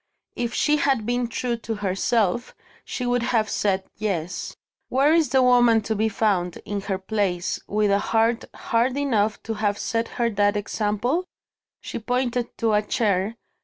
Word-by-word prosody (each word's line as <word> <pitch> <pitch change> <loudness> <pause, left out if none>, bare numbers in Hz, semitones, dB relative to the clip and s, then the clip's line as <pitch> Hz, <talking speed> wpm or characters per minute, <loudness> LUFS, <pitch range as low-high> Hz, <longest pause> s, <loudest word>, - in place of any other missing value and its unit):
If 235 -1 -2
she 300 0 +3
had 270 -6 +1
been 245 +1 0
true 235 0 -2
to 230 -1 -4
herself, 205 +3 0 0.3
she 250 - -4
would 245 0 +1
have 230 -3 +1
said, 195 -3 0
Yes. 185 -5 -3 0.3
Where 280 +4 +4
is 325 -5 +3
the 260 0 +4
woman 245 -3 +5
to 220 +1 -2
be 220 +1 +1
found, 195 -4 0
in 205 -1 -3
her 190 - +1
place, 190 -2 -1
with 210 0 +1
a 200 - +3
heart 225 +3 +1
hard 250 +2 0
enough 220 -7 0
to 225 - -3
have 205 -1 0
set 230 0 -1
her 235 -1 +1
that 205 0 +2
example? 215 - -1 0.6
She - - -5
pointed 245 +1 -1
to 225 -2 +1
a 210 - +4
chair. 210 -1 0
225 Hz, 165 wpm, -24 LUFS, 205-245 Hz, 0.6 s, woman